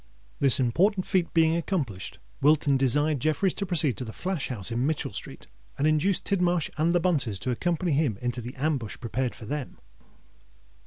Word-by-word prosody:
This 140 Hz, -2 st, +6 dB
important 185 Hz, -, +2 dB
feat 180 Hz, -3 st, 0 dB
being 160 Hz, -1 st, +3 dB
accomplished, 155 Hz, -, -3 dB, 0.2 s
Wilton 145 Hz, -1 st, +4 dB
desired 145 Hz, +3 st, +2 dB
Jeffreys 155 Hz, +6 st, +1 dB
to 200 Hz, -, -4 dB
proceed 155 Hz, -, +2 dB
to -, -, -4 dB
the 110 Hz, -, -7 dB
flash 180 Hz, +3 st, -3 dB
house 110 Hz, -5 st, -5 dB
in 120 Hz, +2 st, 0 dB
Mitchell 155 Hz, -1 st, -2 dB
Street, -, -, -8 dB, 0.3 s
and 145 Hz, -, 0 dB
induce 155 Hz, +5 st, +3 dB
Tidmarsh 180 Hz, -4 st, 0 dB
and 160 Hz, +2 st, +2 dB
the 175 Hz, -, +3 dB
Bunces 145 Hz, -, +1 dB
to 125 Hz, +7 st, -3 dB
accompany 175 Hz, +7 st, -1 dB
him 140 Hz, -7 st, +1 dB
into 125 Hz, 0 st, -2 dB
the 120 Hz, +2 st, -8 dB
ambush 135 Hz, -6 st, -2 dB
prepared 120 Hz, +1 st, -2 dB
for 115 Hz, -, -10 dB
them. 145 Hz, +2 st, -5 dB
150 Hz, 175 wpm, -27 LUFS, 125-170 Hz, 0.3 s, This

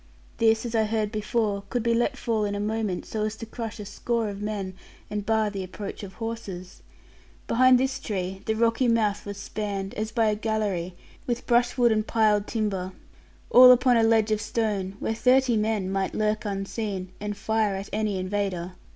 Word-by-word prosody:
This, 225 Hz, 0 st, +3 dB
as 235 Hz, -, -4 dB
I 220 Hz, -1 st, +3 dB
heard 215 Hz, -1 st, -1 dB
before, 210 Hz, -1 st, -1 dB
could 245 Hz, -2 st, -1 dB
be 235 Hz, 0 st, +2 dB
let 240 Hz, +4 st, +1 dB
fall 225 Hz, -5 st, 0 dB
in 205 Hz, -1 st, -1 dB
a -, -, -3 dB
moment, 210 Hz, -3 st, -2 dB
so 215 Hz, -1 st, -3 dB
as 215 Hz, 0 st, -3 dB
to 230 Hz, -, -7 dB
crush 225 Hz, 0 st, -6 dB
a 210 Hz, -, -6 dB
score 225 Hz, +2 st, -2 dB
of 200 Hz, 0 st, -7 dB
men, 205 Hz, -3 st, -3 dB, 0.4 s
and 210 Hz, -1 st, -2 dB
bar 220 Hz, -1 st, +2 dB
the 195 Hz, -2 st, -4 dB
approach 195 Hz, +2 st, -7 dB
of 195 Hz, -2 st, -8 dB
horses. 215 Hz, -6 st, -6 dB, 0.6 s
Behind 255 Hz, +1 st, +5 dB
this 265 Hz, 0 st, -1 dB
tree, 190 Hz, -2 st, -4 dB
the 220 Hz, -, +1 dB
rocky 230 Hz, +3 st, +2 dB
mouth 215 Hz, -3 st, +1 dB
was 200 Hz, -1 st, -5 dB
spanned, 200 Hz, -1 st, -4 dB
as 215 Hz, +1 st, -3 dB
by 225 Hz, 0 st, +2 dB
a 215 Hz, -1 st, +2 dB
gallery 210 Hz, -5 st, -2 dB, 0.3 s
with 240 Hz, -1 st, -2 dB
brushwood 240 Hz, 0 st, +3 dB
and 215 Hz, 0 st, +1 dB
piled 215 Hz, -2 st, +2 dB
timber, 195 Hz, -5 st, -2 dB, 0.6 s
all 250 Hz, 0 st, +10 dB
upon 250 Hz, 0 st, +5 dB
a 230 Hz, -, +4 dB
ledge 225 Hz, -1 st, +3 dB
of 215 Hz, 0 st, +1 dB
stone, 210 Hz, -4 st, -2 dB
where 225 Hz, -, -1 dB
thirty 250 Hz, +1 st, +3 dB
men 210 Hz, -3 st, 0 dB
might 195 Hz, -1 st, -1 dB
lurk 215 Hz, +1 st, 0 dB
unseen, 195 Hz, -1 st, -3 dB
and 210 Hz, -1 st, -4 dB
fire 215 Hz, -1 st, 0 dB
at 195 Hz, +1 st, -5 dB
any 210 Hz, -2 st, 0 dB
invader. 185 Hz, -2 st, -2 dB
215 Hz, 190 wpm, -26 LUFS, 200-230 Hz, 0.6 s, all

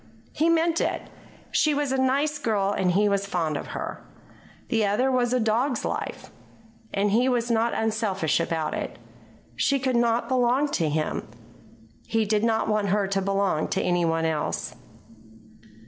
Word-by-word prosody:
He 320 Hz, +2 st, +1 dB
meant 335 Hz, 0 st, +2 dB
it. -, -, -2 dB, 0.4 s
She 305 Hz, -2 st, +2 dB
was 290 Hz, -2 st, -1 dB
a 265 Hz, -, +1 dB
nice 280 Hz, +3 st, +1 dB
girl 205 Hz, -6 st, 0 dB
and 185 Hz, -3 st, +1 dB
he 205 Hz, +3 st, +3 dB
was 200 Hz, -1 st, 0 dB
fond 165 Hz, -5 st, -1 dB
of -, -, -4 dB
her. -, -, -5 dB, 0.7 s
The 225 Hz, -3 st, +2 dB
other 210 Hz, +6 st, +2 dB
was 245 Hz, -2 st, +1 dB
a 255 Hz, -, +2 dB
dog's 235 Hz, +4 st, 0 dB
life. -, -, -4 dB, 0.6 s
And 200 Hz, +1 st, +1 dB
he 245 Hz, +5 st, +3 dB
was 240 Hz, -1 st, 0 dB
not 230 Hz, +1 st, +1 dB
unselfish 215 Hz, -8 st, 0 dB
about 165 Hz, -1 st, -1 dB
it. -, -, -4 dB, 0.6 s
She 280 Hz, -, +2 dB
could 260 Hz, -1 st, -1 dB
not 235 Hz, 0 st, +2 dB
belong 255 Hz, +3 st, +2 dB
to 165 Hz, -, 0 dB
him. 155 Hz, +1 st, -2 dB, 0.8 s
He 225 Hz, -1 st, +1 dB
did 210 Hz, +1 st, +1 dB
not 225 Hz, -1 st, +1 dB
want 210 Hz, -2 st, +1 dB
her 205 Hz, +1 st, +2 dB
to 195 Hz, 0 st, 0 dB
belong 195 Hz, -4 st, 0 dB
to 190 Hz, -, -1 dB
any 175 Hz, -1 st, +1 dB
one 165 Hz, 0 st, +1 dB
else. 155 Hz, -2 st, -2 dB
220 Hz, 165 wpm, -25 LUFS, 195-255 Hz, 0.8 s, he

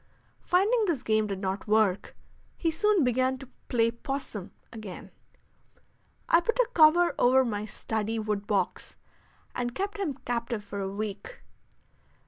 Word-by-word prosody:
Finding 425 Hz, +6 st, +2 dB
this 295 Hz, -8 st, -1 dB
game 215 Hz, -1 st, +2 dB
did 195 Hz, -2 st, -3 dB
not 190 Hz, +1 st, -3 dB
work, 210 Hz, -3 st, +2 dB, 0.4 s
he 330 Hz, -, 0 dB
soon 410 Hz, +1 st, +2 dB
began 255 Hz, +1 st, +1 dB
to 270 Hz, 0 st, -11 dB, 0.2 s
"play 230 Hz, -1 st, +2 dB
'possum" 235 Hz, -5 st, -5 dB, 0.2 s
again. 215 Hz, -5 st, -9 dB, 1.2 s
I 335 Hz, -, +6 dB
put 460 Hz, +7 st, -1 dB
a -, -, +3 dB
cover 340 Hz, +2 st, +6 dB
over 260 Hz, +1 st, +5 dB
my 210 Hz, -3 st, -2 dB
study 220 Hz, 0 st, -3 dB
wood 210 Hz, -2 st, -2 dB
box 205 Hz, -2 st, -1 dB, 0.6 s
and 245 Hz, 0 st, -3 dB
kept 405 Hz, +2 st, -3 dB
him 320 Hz, -9 st, -1 dB
captive 235 Hz, -2 st, -2 dB
for 200 Hz, 0 st, -6 dB
a 195 Hz, -1 st, -2 dB
week. 215 Hz, -, -6 dB
240 Hz, 140 wpm, -28 LUFS, 210-325 Hz, 1.2 s, I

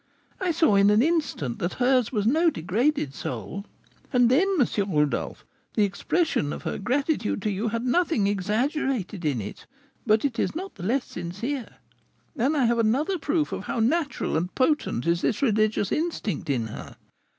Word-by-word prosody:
I 375 Hz, -, -1 dB
saw 320 Hz, -8 st, +3 dB
in 200 Hz, +1 st, +5 dB
an 210 Hz, +3 st, +5 dB
instant 300 Hz, -, -1 dB
that 175 Hz, -, -2 dB
hers 250 Hz, -2 st, +2 dB
was 210 Hz, -5 st, 0 dB
no 320 Hz, +9 st, +4 dB
degraded 215 Hz, -, 0 dB
soul. 130 Hz, -, -5 dB, 0.4 s
And 245 Hz, -2 st, +4 dB
then, 330 Hz, +10 st, +4 dB
M. 205 Hz, -6 st, +1 dB
Rodolph, 145 Hz, -, 0 dB, 0.3 s
the 210 Hz, -, +4 dB
expression 200 Hz, -, 0 dB
of -, -, -6 dB
her -, -, -3 dB
gratitude 260 Hz, +2 st, 0 dB
to 210 Hz, -, 0 dB
you 205 Hz, +4 st, -2 dB
had 230 Hz, +2 st, -2 dB
nothing 315 Hz, -, +2 dB
exaggerated 210 Hz, -, -1 dB
in 140 Hz, -6 st, +1 dB
it; 105 Hz, -1 st, -8 dB, 0.4 s
but 215 Hz, +4 st, +3 dB
it 255 Hz, -4 st, -1 dB
is -, -, 0 dB
not 380 Hz, +4 st, -5 dB
the -, -, -12 dB
less 245 Hz, +8 st, 0 dB
sincere. 220 Hz, +10 st, -5 dB, 0.6 s
And 280 Hz, +4 st, +1 dB
I 265 Hz, -, +3 dB
have 235 Hz, 0 st, +2 dB
another 280 Hz, -, +1 dB
proof 300 Hz, +1 st, 0 dB
of -, -, -4 dB
how -, -, -2 dB
natural 280 Hz, -, 0 dB
and 175 Hz, +3 st, -3 dB
potent 260 Hz, -, +1 dB
is 170 Hz, +1 st, +1 dB
this 220 Hz, -, 0 dB
religious 215 Hz, -4 st, +2 dB
instinct 225 Hz, -, -2 dB
in 125 Hz, -5 st, 0 dB
her. 110 Hz, -, -8 dB
230 Hz, 175 wpm, -25 LUFS, 190-285 Hz, 0.6 s, in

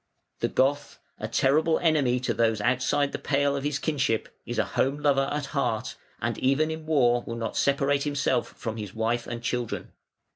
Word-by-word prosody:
The -, -, +1 dB
Goth, 140 Hz, +2 st, 0 dB, 0.2 s
a -, -, -3 dB
terrible 155 Hz, +4 st, +3 dB
enemy 145 Hz, -7 st, +2 dB
to 130 Hz, -, 0 dB
those 115 Hz, -2 st, +2 dB
outside 130 Hz, +5 st, +1 dB
the -, -, -4 dB
pale 140 Hz, 0 st, +1 dB
of 140 Hz, -, -3 dB
his 145 Hz, -1 st, 0 dB
kinship, 135 Hz, -8 st, 0 dB, 0.2 s
is 120 Hz, -, -4 dB
a 110 Hz, -, +2 dB
home 135 Hz, +2 st, +1 dB
lover 140 Hz, -2 st, +2 dB
at 150 Hz, -1 st, -2 dB
heart, 115 Hz, -6 st, -1 dB, 0.2 s
and -, -, -2 dB
even 140 Hz, +4 st, +2 dB
in 160 Hz, 0 st, -6 dB
war 120 Hz, -6 st, +3 dB
will 115 Hz, -, -4 dB
not 115 Hz, -2 st, -4 dB
separate 140 Hz, 0 st, +2 dB
himself 145 Hz, 0 st, 0 dB
from 115 Hz, -1 st, -4 dB
his 105 Hz, -2 st, -6 dB
wife 115 Hz, +2 st, -1 dB
and 120 Hz, 0 st, -5 dB
children. 120 Hz, -1 st, -3 dB
135 Hz, 185 wpm, -27 LUFS, 120-145 Hz, 0.2 s, terrible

